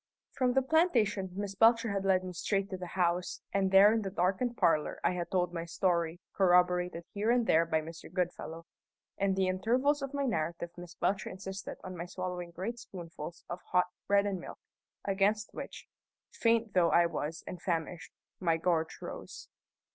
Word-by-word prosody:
From 250 -2 +1
the 265 +1 +3
plantation 235 - +2
Miss 200 0 -3
Belcher 230 +2 +4
had 195 -1 -2
led 185 -1 +3
me 185 -1 -6
straight 195 +3 -1
to 190 - -3
the 180 -1 -6
house, 175 0 0
and 195 -1 +2
there 195 +3 +7
in 225 - +1
the 195 - -3
darkened 195 +6 0
parlour 155 -2 +2
I - - +3
had 175 -1 -3
told 180 -2 0
my 170 -1 -3
story, 170 -1 0
corroborated 180 -2 +3
here 210 +2 0
and 240 -1 +3
there 165 -3 +4
by 160 -1 +1
Mr. 165 +1 -10
Goodfellow. 175 -2 -3 0.5
In 195 -1 +2
the 190 -1 +2
intervals 250 +10 +2
of 275 -1 -4
my 280 -1 0
narrative 170 -6 -2
Miss 175 0 -10
Belcher 195 0 0
insisted 190 +1 -7
on 185 -1 -6
my 175 0 -5
swallowing 180 -1 -4
great 195 +8 -5
spoonfuls 170 -6 -8
of 175 - -5
hot 180 0 +4 0.2
bread 200 0 +4
and 195 -2 -1
milk, - - -9 0.5
against 205 +2 +1
which - - -7 0.5
faint 230 -2 +1
though 175 -2 +4
I 170 - +5
was 160 -1 -3
and 180 - -7
famished 170 -1 -3 0.3
my 165 -3 +2
gorge 165 -1 -1
rose. - - -8
185 Hz, 180 wpm, -31 LUFS, 175-205 Hz, 0.5 s, there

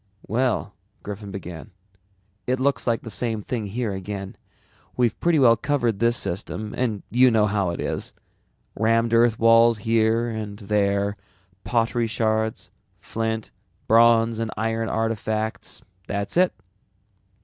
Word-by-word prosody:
"Well," 115 -2 -1 0.3
Griffin 105 0 -7
began, 90 -1 -8 0.8
"it 130 +1 0
looks 140 0 0
like 115 -1 +1
the 115 - -7
same 110 -1 -1
thing 110 -3 -3
here 110 0 -3
again. 95 0 -6 0.6
We've 120 -3 +1
pretty 170 -2 +2
well 120 -5 +6
covered 120 -4 -1
this 120 +1 +3
system 105 +3 -4
and 115 -5 -2
you 125 +2 +5
know 110 -3 +3
how 100 -3 0
it 85 - -4
is. - - -3 0.6
Rammed 115 +1 +2
earth 115 -1 +4
walls 115 0 +5
here 115 +2 +1
and 110 -3 -5
there, 100 -1 0 0.5
pottery 115 +3 0
shards, 110 0 -1 0.3
flint, 110 -1 -3 0.4
bronze 115 0 +4
and 115 -1 -2
iron 115 +1 -1
artifacts 110 -1 -2
and - - -29 0.2
that's 100 0 -3
it. 180 +1 +4
115 Hz, 135 wpm, -23 LUFS, 105-115 Hz, 0.8 s, well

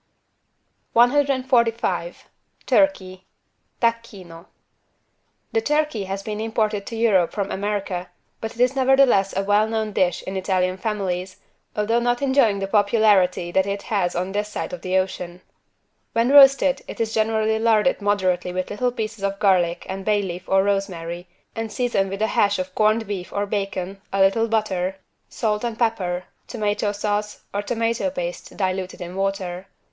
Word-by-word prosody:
145 255 - +2 0.4
TURKEY 190 -11 +1 0.6
(Tacchino) 205 -8 -3 1.0
The 450 - +1
turkey 300 - 0
has 195 +1 -4
been 215 0 -4
imported 215 -2 -1
to 230 - -5
Europe 210 -6 +3
from 200 -2 -3
America, 195 -3 -3 0.3
but 225 - -6
it - - -16
is 250 +2 +3
nevertheless 260 -8 +3
a 195 - +1
well 205 +2 +3
known 220 -1 -2
dish 180 -2 +1
in 190 - -6
Italian 185 -1 0
families, 185 -3 -3 0.4
although 215 +3 +1
not 245 +2 0
enjoying 265 -7 +3
the 195 - -2
popularity 200 -4 +3
that 190 +2 +2
it 200 0 -3
has 195 -5 -1
on 180 +2 -2
this 210 +1 -2
side 210 - -5
of 175 - -6
the 185 0 0
ocean. 180 -1 -3 0.7
When 230 +2 +2
roasted 275 -1 +6
it - - -8
is 225 -1 -1
generally 220 0 +1
larded 225 +2 +2
moderately 185 -3 0
with 185 0 -3
little 245 +4 0
pieces 215 -3 -5
of 195 0 -1
garlic 180 -4 +2
and 190 +1 -5
bay 205 0 +1
leaf 180 0 -6
or 190 0 +4
rosemary 180 -3 -2 0.3
and 225 -1 -4
seasoned 225 -4 0
with 195 +2 -3
a - - +3
hash 200 0 +3
of 185 0 -4
corned 215 +2 +2
beef 195 -3 -5
or 205 0 -1
bacon, 195 -1 -4
a 195 - -1
little 195 +4 +3
butter, 195 -4 -1 0.3
salt 210 -1 -1
and 235 -2 -3
pepper, 190 -7 -1 0.2
tomato 210 -2 -1
sauce 210 0 -3
or 205 - -1
tomato 230 +4 -1
paste 175 -10 -6
diluted 185 -1 -2
in 175 0 -7
water. 195 -1 -3
205 Hz, 155 wpm, -22 LUFS, 190-225 Hz, 1.0 s, roasted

